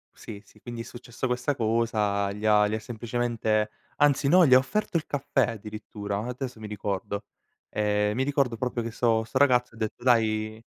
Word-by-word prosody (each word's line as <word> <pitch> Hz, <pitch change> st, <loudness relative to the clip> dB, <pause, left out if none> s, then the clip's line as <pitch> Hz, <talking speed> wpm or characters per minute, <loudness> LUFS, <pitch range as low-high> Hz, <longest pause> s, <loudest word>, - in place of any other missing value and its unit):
Sì, 105 Hz, -2 st, -9 dB
sì 105 Hz, -, -21 dB
quindi 120 Hz, -1 st, -6 dB
è -, -, -5 dB
successo 120 Hz, +1 st, -6 dB
questa 125 Hz, +3 st, -1 dB
cosa 110 Hz, -3 st, 0 dB
gli 105 Hz, +2 st, -6 dB
ha 105 Hz, -1 st, +5 dB
gli 105 Hz, -, -3 dB
ha 110 Hz, -, -1 dB
semplicemente 115 Hz, -1 st, -1 dB, 0.3 s
anzi 145 Hz, -1 st, +3 dB
no, 180 Hz, +3 st, +6 dB
gli 130 Hz, -, +5 dB
ha 130 Hz, -, +10 dB
offerto 170 Hz, +7 st, 0 dB
il 160 Hz, -, -3 dB
caffè 135 Hz, -3 st, 0 dB
addirittura, 105 Hz, -2 st, -6 dB
adesso 125 Hz, -1 st, -5 dB
mi 110 Hz, -, -7 dB
ricordo. 100 Hz, 0 st, -4 dB, 0.4 s
Ehm, 105 Hz, 0 st, 0 dB
mi 130 Hz, -, +1 dB
ricordo 135 Hz, -4 st, 0 dB
proprio 125 Hz, 0 st, -2 dB
che 115 Hz, -, -4 dB
so 115 Hz, -1 st, +2 dB
sto 110 Hz, +3 st, -3 dB
ragazzo 125 Hz, -4 st, +3 dB
ha -, -, -14 dB
detto: 110 Hz, +1 st, -4 dB
"Dai" 110 Hz, -2 st, +2 dB
115 Hz, 190 wpm, -27 LUFS, 105-125 Hz, 0.4 s, ha